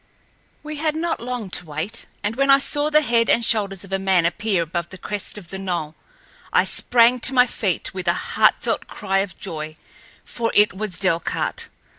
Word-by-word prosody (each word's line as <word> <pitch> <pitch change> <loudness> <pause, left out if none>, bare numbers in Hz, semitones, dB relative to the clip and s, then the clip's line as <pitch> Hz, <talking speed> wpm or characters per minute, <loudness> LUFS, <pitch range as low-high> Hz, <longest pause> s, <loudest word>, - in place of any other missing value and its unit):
We 305 0 -6
had 310 0 -1
not 330 +1 -2
long 240 -5 -5
to 175 - -1
wait, 155 +10 -4 0.2
and 210 +2 -1
when 275 +2 +1
I 275 - +8
saw 290 +2 +3
the 305 0 +4
head 235 -3 +2
and 235 - +3
shoulders 200 -4 0
of 195 -1 -9
a 195 - +1
man 190 -3 +2
appear 195 0 0
above 170 +1 -4
the 185 - -10
crest 205 +2 -4
of 180 -5 -11
the 190 - -6
knoll, 175 -5 -3 0.6
I - - +4
sprang 245 +1 +3
to 265 +3 +2
my 250 0 +6
feet, 200 -7 -2
with 185 -1 -6
a - - +4 0.2
heartfelt - - +2
cry 195 -2 -1
of 195 -2 -3
joy, 155 -1 -6 0.5
for 230 -1 -3
it 210 0 +5
was 195 -1 -4
Delcarte. 180 -4 -1
205 Hz, 195 wpm, -22 LUFS, 185-245 Hz, 0.6 s, I